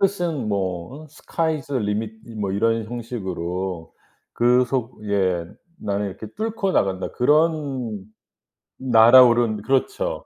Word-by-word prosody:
뜻은 175 - 0
뭐 95 - -3
어 - - -12
Sky's 155 -1 -3
the 135 -4 -1
limit 105 +2 -2 0.3
뭐 100 - -1
이런 115 +2 +1
형식으로 95 -7 -5 0.4
그 125 +1 +3
속에 100 -8 -1 0.4
나는 100 0 -2
이렇게 110 +3 -8
뚫고 215 -3 -2
나간다. 95 - 0
그런 140 - 0 0.8
날아오른 120 -2 +6
그렇죠. 410 - -1
120 Hz, 265 characters per minute, -22 LUFS, 100-140 Hz, 0.8 s, 날아오른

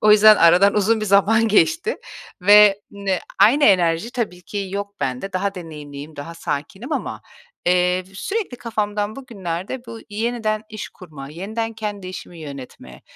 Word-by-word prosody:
O 215 - +6
yüzden 215 0 +8
aradan 180 +4 +5
uzun 215 +2 +2
bir 215 - -2
zaman 215 +3 +4
geçti 330 - +2 0.5
ve 205 0 +7
ne 195 -2 -2 0.2
aynı 250 +9 +5
enerji 180 +2 +3
tabii 205 -8 -3
ki 205 -2 -5
yok 200 0 -5
bende. 130 +10 -3
Daha 195 +2 -1
deneyimliyim, 150 -3 -9
daha 155 +4 -7
sakinim 190 - -5
ama, - - -3 0.4
eee, 180 +1 +2
sürekli 390 - -3
kafamdan 210 -2 -2
bugünlerde 205 -1 -5
bu 230 -1 -8
yeniden 215 0 -1
iş 215 -1 -7
kurma, 150 -7 -11
yeniden 220 +8 -4
kendi 210 -4 -5
işimi 180 -2 -9
yönetme, 130 - -10
200 Hz, 145 wpm, -21 LUFS, 175-220 Hz, 0.5 s, yüzden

